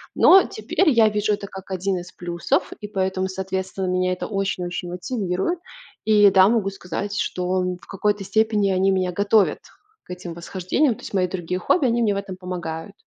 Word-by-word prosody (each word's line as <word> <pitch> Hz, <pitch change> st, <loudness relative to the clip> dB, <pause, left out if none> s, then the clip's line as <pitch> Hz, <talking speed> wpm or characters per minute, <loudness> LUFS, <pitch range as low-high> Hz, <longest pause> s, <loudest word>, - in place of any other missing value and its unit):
Но 380 Hz, 0 st, +7 dB
теперь 305 Hz, -, 0 dB
я 230 Hz, -4 st, +5 dB
вижу 210 Hz, 0 st, 0 dB
это 200 Hz, 0 st, -4 dB
как 190 Hz, 0 st, -10 dB
один 190 Hz, +1 st, -1 dB
из 175 Hz, +1 st, -8 dB
плюсов, 175 Hz, -1 st, -1 dB
и 210 Hz, -, -6 dB
поэтому, 190 Hz, -2 st, -1 dB
соответственно, 190 Hz, 0 st, -3 dB
меня 185 Hz, 0 st, +1 dB
это 180 Hz, -, -5 dB
очень-очень 185 Hz, -3 st, -3 dB
мотивирует. 190 Hz, -, -2 dB, 0.5 s
И 205 Hz, -2 st, +6 dB
да, 190 Hz, 0 st, +6 dB
могу 215 Hz, -3 st, +1 dB
сказать, 195 Hz, +2 st, -5 dB
что, 185 Hz, +1 st, -1 dB
м, 180 Hz, 0 st, -2 dB
в -, -, -16 dB
какой-то 205 Hz, +1 st, -1 dB
степени 215 Hz, 0 st, +1 dB
они 190 Hz, +1 st, +2 dB
меня 185 Hz, -1 st, 0 dB
готовят 205 Hz, +2 st, +2 dB, 0.4 s
к -, -, -34 dB
этим 180 Hz, -1 st, -7 dB
восхождениям. 185 Hz, -, 0 dB
То -, -, -15 dB
есть -, -, -9 dB
мои 185 Hz, -2 st, +2 dB
другие 180 Hz, 0 st, -3 dB
хобби- 290 Hz, -, +2 dB
они 240 Hz, -1 st, +2 dB
мне 215 Hz, -3 st, +2 dB
в -, -, -3 dB
этом 195 Hz, -2 st, -6 dB
помогают. 180 Hz, 0 st, -6 dB
190 Hz, 190 wpm, -22 LUFS, 180-210 Hz, 0.5 s, Но